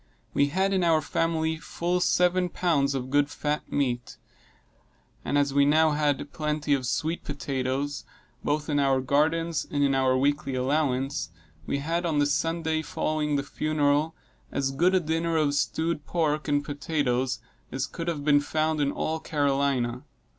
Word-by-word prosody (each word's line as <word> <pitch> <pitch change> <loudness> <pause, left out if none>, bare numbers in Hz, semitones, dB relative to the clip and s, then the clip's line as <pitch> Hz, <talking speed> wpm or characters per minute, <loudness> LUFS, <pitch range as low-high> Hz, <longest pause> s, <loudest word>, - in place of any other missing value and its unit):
We 140 - +3
had, 190 +6 +1
in 185 -2 +2
our 165 -2 +4
family, 160 +1 0
full 175 +2 -2
seven 180 0 +2
pounds 145 -7 +1
of 130 0 -4
good 145 0 +3
fat 150 0 -3
meat; 125 -4 -1 1.1
and 145 - 0
as 140 -1 +2
we 140 0 +5
now 155 +2 +4
had 145 -1 0
plenty 150 -1 -1
of 130 -3 0
sweet 155 +9 -1
potatoes, 140 0 -3 0.4
both 150 +1 -1
in 145 -2 +1
our 135 -1 +3
gardens 155 +5 +1
and 145 -1 0
in 140 -1 +3
our 130 -1 +3
weekly 140 0 0
allowance, 135 - 0 0.4
we - - 0
had 165 +5 -1
on 165 -3 0
the 145 - +4
Sunday 160 +2 0
following 155 -1 -1
the 140 - 0
funeral, 150 +1 0 0.4
as 135 -1 -1
good 175 +7 +2
a - - +5
dinner 165 0 -1
of 150 -2 +2
stewed 155 +1 -1
pork 155 -1 0
and 145 0 +1
potatoes 140 -4 -1 0.3
as 130 - -1
could 165 -1 -6
have 150 -4 -2
been 145 -1 +5
found 155 +1 0
in 140 -1 +1
all 160 +2 -2
Carolina. 140 -5 0
145 Hz, 160 wpm, -27 LUFS, 140-160 Hz, 1.1 s, we